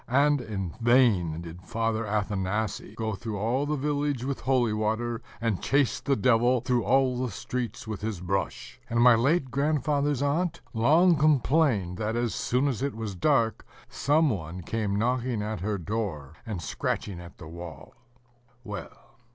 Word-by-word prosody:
And 140 +2 +3
in 95 -7 -4
vain 110 -10 +3
did 85 +1 -9
Father 115 +2 -1
Athanasii 105 0 -2
go 110 -1 -2
through 105 +1 -5
all 120 +8 0
the 150 - 0
village 145 -2 -1
with 140 0 -2
holy 125 -4 +2
water, 110 +2 -1 0.2
and 115 -5 -1
chase 140 -2 +2
the 140 - +1
Devil 120 +2 +3
through 125 -1 0
all 130 +2 +2
the 125 - -1
streets 120 -1 -4
with 110 -3 -5
his 105 -4 -3
brush; 100 +8 -3
and 115 0 0
my 120 +1 +8
late 135 +4 +2
grandfather's 145 0 +1
aunt 170 +4 0
long 160 +10 +5
complained 140 - +2
that, 110 +1 -1
as 120 -1 0
soon 130 +4 +1
as 130 -4 -2
it 140 -2 -1
was 110 -3 -4
dark, 115 - +1 0.3
some 150 +1 +2
one 90 -2 -5
came 105 +2 -2
knocking 120 -1 0
at 110 -2 -3
her 100 +3 -1
door, 90 -7 -4
and 100 -7 -4
scratching 90 +4 -3
at 85 0 -12
the - - -10
wall. 85 0 -9 0.7
Well! 110 +3 -9
115 Hz, 160 wpm, -27 LUFS, 105-135 Hz, 0.7 s, my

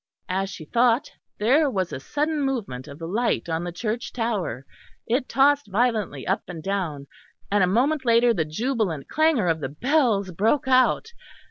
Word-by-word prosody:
As 190 +1 -1
she 165 -5 -9
thought, 235 - +2 0.3
there 275 +8 +3
was 190 -7 -2
a - - -4
sudden 300 - -1
movement 220 - -3
of 140 - -10
the 165 - -7
light 220 +6 0
on 165 0 -2
the 175 - -4
church 220 +6 -3
tower; 205 - -2 0.4
it 250 +3 -1
tossed 280 0 +3
violently 215 - 0
up - - 0
and 165 -3 -8
down, 175 -8 -2 0.5
and 205 -1 +3
a - - +3
moment 265 +9 +1
later 235 0 +4
the 170 -7 0
jubilant 185 - -2
clangour 310 - +2
of 165 -1 +1
the 135 - -4
bells 220 - +1
broke 220 - +1
out. 255 - +3
220 Hz, 170 wpm, -24 LUFS, 175-255 Hz, 0.5 s, later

